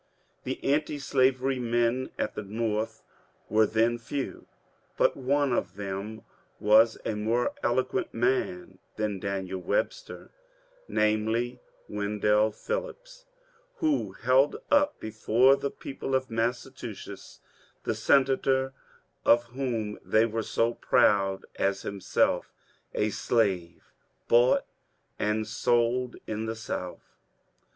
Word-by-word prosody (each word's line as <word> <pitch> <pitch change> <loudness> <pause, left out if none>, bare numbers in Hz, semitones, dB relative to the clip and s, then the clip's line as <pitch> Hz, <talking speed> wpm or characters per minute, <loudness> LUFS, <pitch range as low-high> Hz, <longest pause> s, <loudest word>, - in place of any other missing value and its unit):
The - - -3
anti 150 +1 +1
slavery 130 -1 +1
men 120 +1 +1
at - - -2
the - - -4
North 110 +1 -2 0.5
were 110 +1 +4
then 115 +2 +2
few, 135 +3 -5 0.5
but - - +3
one 140 0 +1
of 120 - -1
them 100 +2 -5 0.4
was 110 +2 +5
a 115 - 0
more 115 - 0
eloquent - - 0
man 365 - -1 0.2
than 105 -2 -2
Daniel 95 -1 -3
Webster; 105 - -2 0.6
namely, 110 +3 0 0.3
Wen 105 0 -3
dell 105 +1 +3
Phillips, - - -6 0.5
who 315 -9 0
held 130 +3 +3 0.2
up 290 0 +3
before 115 +4 +3
the 140 - -3
people 135 -1 -4
of 130 -2 -1
Massachusetts 115 -3 -4 0.4
the - - 0
senator 135 -1 +2 0.5
of 120 0 +5
whom 115 -5 -3
they 110 +1 +3
were 115 0 -2
so 115 +1 0
proud 95 -4 +2
as 100 0 0
himself 100 -1 0 0.4
a 105 0 +1
slave 95 -8 0 0.4
bought 120 +2 +4 0.5
and 105 +1 0
sold 120 +2 +1
in 110 +1 -3
the 110 - -3
South. 90 -5 -6
115 Hz, 110 wpm, -28 LUFS, 105-130 Hz, 0.6 s, was